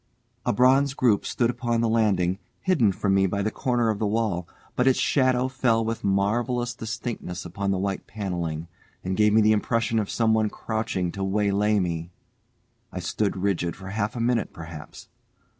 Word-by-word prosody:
A - - +4
bronze 135 +3 +4
group 115 -7 +2
stood 120 -1 +1
upon 120 -2 -1
the 115 - +2
landing, 100 -5 +2 0.2
hidden 155 - +3
from 95 +1 0
me 95 0 +4
by 100 +2 -1
the 110 - 0
corner 120 -2 +1
of 105 - -4
the 110 - 0
wall, 105 -5 -1 0.3
but 125 - +2
its 130 - +4
shadow 130 -2 +2
fell 120 -4 +1
with 115 0 -3
marvellous 120 +5 0
distinctness 110 -6 -5
upon 100 +3 -3
the 95 - +1
white 95 0 -3
panelling, 85 -6 -4 0.4
and 95 +1 -2
gave 105 +1 +4
me 110 +1 +5
the 110 0 +4
impression 115 +1 +1
of 105 - -2
someone 110 -2 +2
crouching 110 -7 -2
to 95 - -4
waylay 105 +1 +2
me. 85 -2 -2 0.8
I 90 - -5
stood 95 +3 -1
rigid 90 -3 -1
for 95 -1 -9
half 105 +2 -2
a - - -4
minute 115 -1 0
perhaps. 80 -2 -10
105 Hz, 175 wpm, -25 LUFS, 95-115 Hz, 0.8 s, me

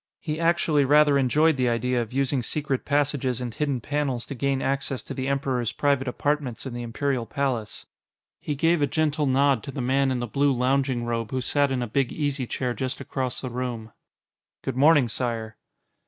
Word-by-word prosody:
He 155 -1 -4
actually 165 -3 +2
rather 145 +1 +5
enjoyed 150 +4 +3
the 125 -1 +2
idea 120 +1 0
of 115 - -6
using 135 0 +1
secret 140 +2 -2
passages 140 -4 +1
and 120 -2 -4
hidden 140 +1 -1
panels 135 -2 -2
to - - -6
gain 135 +1 0
access 135 -2 -2
to - - -7
the 130 -1 -3
Emperor's 130 -4 -1
private 140 0 +1
apartments 140 -2 -2
in 130 - -5
the 120 - -4
Imperial 120 +1 -2
Palace. 125 -5 -2 0.5
He 150 - -3
gave 165 +3 +2
a 145 - +3
gentle 150 -1 0
nod 135 -2 +3
to - - -9
the 140 - -6
man 135 +2 +2
in 130 - 0
the 120 - -2
blue 140 +4 +2
lounging 130 -1 +1
robe 115 -2 -2
who 130 - -2
sat 145 +2 +2
in 130 -2 -1
a - - -3
big 130 +3 0
easy 145 -4 -2
chair 125 0 -2
just 130 +3 -3
across 130 -2 -3
the 130 - -5
room. 120 -3 -4 0.7
"Good 135 - -3
morning, 145 -1 +5
Sire." 115 -2 -3
135 Hz, 195 wpm, -25 LUFS, 120-145 Hz, 0.7 s, rather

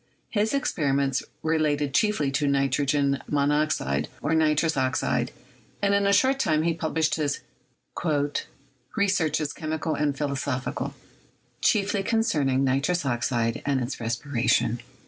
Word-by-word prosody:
His 215 +4 +1
experiments 140 - 0 0.2
related 150 -3 +1
chiefly 180 -8 +2
to 145 +1 0
nitrogen 140 0 +1
monoxide, 145 - +1
or 145 - -1
nitrous 160 0 +2
oxide, 130 -1 0 0.5
and 200 0 +2
in 200 0 +3
a - - +4
short 265 +7 +3
time 155 - +2
he 170 0 +2
published 160 -1 0
his 145 -1 -1 1.6
"Researches 160 -7 +1
Chemical 155 0 -3
and 145 -2 0
Philo 145 -1 -1
sophical, 130 -1 -3 0.7
chiefly 205 -1 +2
concerning 150 - +1
Nitrous 140 +5 +1
Oxide 120 -2 0
and 140 -2 +1
its 125 +2 -4
Res 115 0 -1
piration." 120 -3 +1
145 Hz, 125 wpm, -26 LUFS, 135-160 Hz, 1.6 s, a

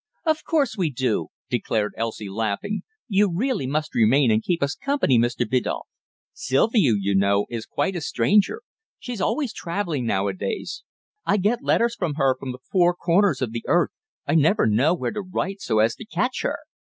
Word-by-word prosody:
"Of 315 -1 +1
course 295 -7 +1
we 180 -6 0
do," 120 - -1 0.2
declared 105 -1 -1
Elsie, 110 -2 -4
laughing. 110 - -2 0.3
"You 205 -3 +3
really 205 - -1
must 150 +3 -2
remain 120 +3 +4
and 110 0 +3
keep 170 +1 -1
us 140 +1 0
company, 275 - +1
Mr. 120 0 0
Biddulph. 125 +2 -1 0.5
Sylvia, 140 - +2
you 100 0 0
know, 100 +1 +3
is 115 -2 -5
quite 190 -1 -1
a 175 - -3
stranger. 190 - +2 0.3
She's 245 -6 -6
always 280 +3 0
travelling 170 - -3
now 100 -2 +1
a 100 - -1
days. 95 +1 -4 0.4
I 205 - +2
get 215 +5 +1
letters 235 -3 +2
from 175 -10 -2
her 135 -3 +2
from 130 0 -6
the 125 - -9
four 175 -2 +4
corners 180 -2 +2
of 120 - -2
the 115 0 -5
earth. - - +3 0.3
I - - 0
never 165 +7 +4
know 125 +11 +3
where - - -3
to 215 - -4
write 195 +1 -4
so 110 - 0
as 110 +1 +3
to - - -9
catch 250 +3 -1
her." - - -1
155 Hz, 190 wpm, -23 LUFS, -, 0.5 s, remain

